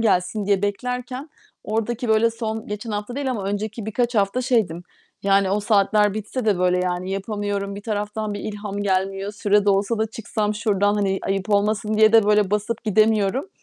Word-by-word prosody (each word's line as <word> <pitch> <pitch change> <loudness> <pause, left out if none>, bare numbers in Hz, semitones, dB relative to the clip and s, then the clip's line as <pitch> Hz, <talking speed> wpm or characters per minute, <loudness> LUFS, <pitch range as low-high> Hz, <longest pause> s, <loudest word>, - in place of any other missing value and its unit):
gelsin 195 -1 +1
diye 200 -1 +2
beklerken, 250 +6 -3 0.3
oradaki, 225 +3 -2
böyle, 220 +1 +4
son 225 -1 -4
geçen 210 +2 -5
hafta 210 +4 -4
değil 280 -2 -1
ama 215 -6 -3
önceki 210 +2 -3
birkaç 240 +2 -1
hafta 205 +5 +1
şeydim: 210 -9 +1 0.4
Yani 195 -1 +3
o 205 +2 +1
saatler 210 0 +3
bitse 215 +4 -4
de, 210 -4 +2
böyle, 180 0 +2
yani 180 +1 -2
yapamıyorum 200 0 -3
bir 200 - -8
taraftan, 210 0 -3
bir 205 - -5
ilham 205 -1 -5
gelmiyor. 195 +1 -1
Süre 205 -1 +2
dolsa 205 +3 +2
da 220 - +1
çıksam 215 -1 -3
şuradan, 205 -2 +1
hani 195 -2 0
ayıp 195 +2 -2
olmasın 210 +1 +1
diye 215 +1 +5
de 225 -2 +6
böyle 210 -2 +3
basıp 210 +2 -2
gidemiyorum. 215 - +2
210 Hz, 175 wpm, -22 LUFS, 200-220 Hz, 0.4 s, de